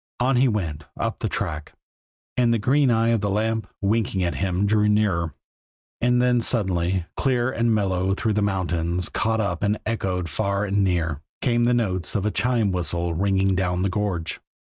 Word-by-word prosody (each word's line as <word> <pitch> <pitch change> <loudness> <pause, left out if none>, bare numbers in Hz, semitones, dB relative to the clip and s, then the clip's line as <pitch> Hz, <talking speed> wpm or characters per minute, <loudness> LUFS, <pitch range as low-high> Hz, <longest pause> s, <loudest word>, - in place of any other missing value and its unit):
On 130 +2 +2
he 130 +2 +4
went, 85 -10 -2
up - - -2
the - - -2
track; 75 0 -4 0.6
and 120 -2 +3
the 115 - +3
green 135 +5 +3
eye 115 0 +3
of 115 -3 +2
the 100 - 0
lamp, 110 +2 0
winking 100 -2 0
at 85 - 0
him, 95 0 0
drew 105 0 +3
nearer. 95 -7 +1 0.7
And 125 0 +3
then 125 -1 +3
suddenly, 95 -6 0
clear 130 -1 +1
and 115 -2 +1
mellow 95 -3 +1
through 110 +1 0
the 105 - +1
mountains, 90 -3 0
caught 110 +1 0
up 90 -6 -1
and 105 +1 +1
echoed 95 -5 -2
far 100 +4 -1
and 100 0 +1
near, 85 -5 0 0.2
came 120 -2 +2
the 120 0 +3
notes 95 -7 -1
of 100 -1 0
a 105 - +1
chime 115 -4 +1
whistle 85 -1 -1
ringing 95 +2 +1
down 90 -1 0
the 100 - +1
gorge. 90 -4 -2
100 Hz, 185 wpm, -23 LUFS, 90-115 Hz, 0.7 s, he